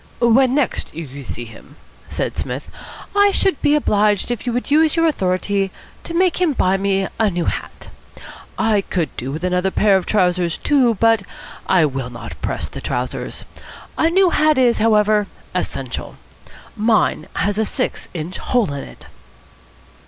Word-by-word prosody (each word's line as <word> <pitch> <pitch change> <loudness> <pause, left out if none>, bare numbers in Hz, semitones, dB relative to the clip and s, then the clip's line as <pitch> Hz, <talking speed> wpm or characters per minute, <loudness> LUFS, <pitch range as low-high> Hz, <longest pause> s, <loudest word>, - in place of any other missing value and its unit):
"When 250 +2 +4
next 290 - -1
you 140 -4 -7
see 120 -1 -6
him," 115 +5 -14 0.3
said - - -3
Psmith, - - -5 0.4
"I 405 0 +6
should 385 -4 +1
be 295 - +4
obliged 210 -6 +2
if 240 +1 -4
you - - +1
would 250 +3 -3
use 315 +2 +4
your 330 0 +3
authority 195 - 0 0.3
to 335 - -6
make 365 0 +2
him 340 -5 +3
buy 190 -6 +2
me 195 0 0
a 220 -2 +3
new 175 -2 -2
hat. - - -5 0.7
I 215 -2 +2
could 175 -4 -3
do 130 +2 -4
with 155 +4 -5
another 180 +1 +1
pair 200 +1 +3
of 185 - -4
trousers, 180 -4 +1
too; 260 -6 +2
but 225 +1 +3 0.5
I 180 -4 +4
will 135 -3 -3
not 120 -1 -9
press - - -3
the - - -9
trousers. 125 +1 -4 0.5
A 325 - +2
new 370 +1 +4
hat, 305 -2 +3
is, 245 -2 +3
however, 210 -1 +3 0.3
essential. - - -4 0.6
Mine 215 -7 +1
has 205 +1 0
a - - +3
six - - -3
inch 170 +2 -5
hole 230 - 0
in 140 - -5
it." - - -12
210 Hz, 165 wpm, -19 LUFS, 180-260 Hz, 0.7 s, I